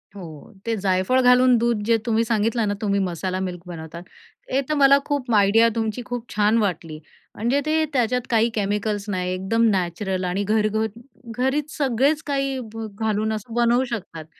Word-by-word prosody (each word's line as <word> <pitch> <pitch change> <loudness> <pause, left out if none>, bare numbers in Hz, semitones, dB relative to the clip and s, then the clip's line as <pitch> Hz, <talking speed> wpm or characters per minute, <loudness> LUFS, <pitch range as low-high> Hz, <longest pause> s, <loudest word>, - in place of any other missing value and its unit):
हो. 165 -2 -10
ते 230 -1 0
जायफळ 190 +7 +2
घालून 250 0 +5
दूध 235 -2 0
जे 230 0 +3
तुम्ही 230 0 +2
सांगितलं 225 0 0
ना 205 - 0
तुम्ही 200 -1 +1
मसाला 185 0 -2
मिल्क 180 -2 -4
बनवतात, 170 0 -8 0.5
हे 270 +2 +2
तर - - +1
मला 280 -1 +6
खूप 275 -4 -2
आयडिया 205 +3 +5
तुमची 225 +1 -2
खूप 245 -1 -5
छान 215 +2 +3
वाटली 165 -7 -2 0.4
म्हणजे, 240 +6 +1
ते 315 +1 +2
त्याच्यात 250 0 +1
काही 230 0 +3
केमिकल्स 205 0 -2
नाही 180 -2 -2
एकदम 190 +5 0
नॅचरल 185 0 -1
आणि 180 +3 -1
घरघर 215 +1 +1 0.5
घरीच 275 +4 -1
सगळेच 280 +3 +1
काही 275 -2 -1 0.4
घालून 220 0 0
असं 215 +2 -6
भ 240 - -4
बनवू 240 +2 +3
शकतात 185 -9 -6
220 Hz, 165 wpm, -22 LUFS, 195-245 Hz, 0.5 s, मला